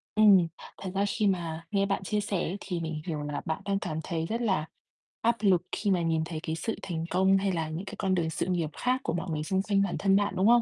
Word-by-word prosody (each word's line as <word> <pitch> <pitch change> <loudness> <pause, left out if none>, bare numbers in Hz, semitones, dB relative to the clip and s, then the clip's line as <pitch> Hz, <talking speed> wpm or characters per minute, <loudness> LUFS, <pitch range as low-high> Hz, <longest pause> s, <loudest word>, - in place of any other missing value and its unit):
Ừm. 200 -5 +7 0.3
Thật 190 -2 -4
ra 200 +1 +2
khi 205 0 +1
mà 165 -3 -1
nghe 200 -1 +2
bạn 195 -1 -1
chia 210 +2 0
sẻ 195 -2 -1
thì 180 -3 -3
mình 160 -2 -3
hiểu 155 -3 -2
là 145 0 -3
bạn 160 +5 -2
đang 200 0 +1
cảm 155 -4 -3
thấy 165 -2 -2
rất 230 +6 -2
là 190 -8 +1 0.6
áp 235 +1 +3
lực 190 -5 +4
khi 205 -2 0
mà 180 -2 +2
nhìn 160 -1 +1
thấy 160 -2 -4
cái 160 0 -2
sự 225 +7 -2
thành 165 -3 -3
công, 190 +2 +4
hay 195 0 +1
là 160 -3 -1
những 165 +5 -4
cái - - -7
con 190 -1 +1
đường 165 -2 0
sự - - -2
nghiệp 175 -4 0
khác 255 +1 +1
của - - -1
mọi 175 +1 -3
người 150 -1 -1
xung 190 +4 +1
quanh 200 -1 +2
bản 185 - -1
thân 195 -1 +4
bạn, 205 0 +2
đúng 190 +3 +3
không? 240 0 +7
185 Hz, 270 wpm, -29 LUFS, 165-200 Hz, 0.6 s, Ừm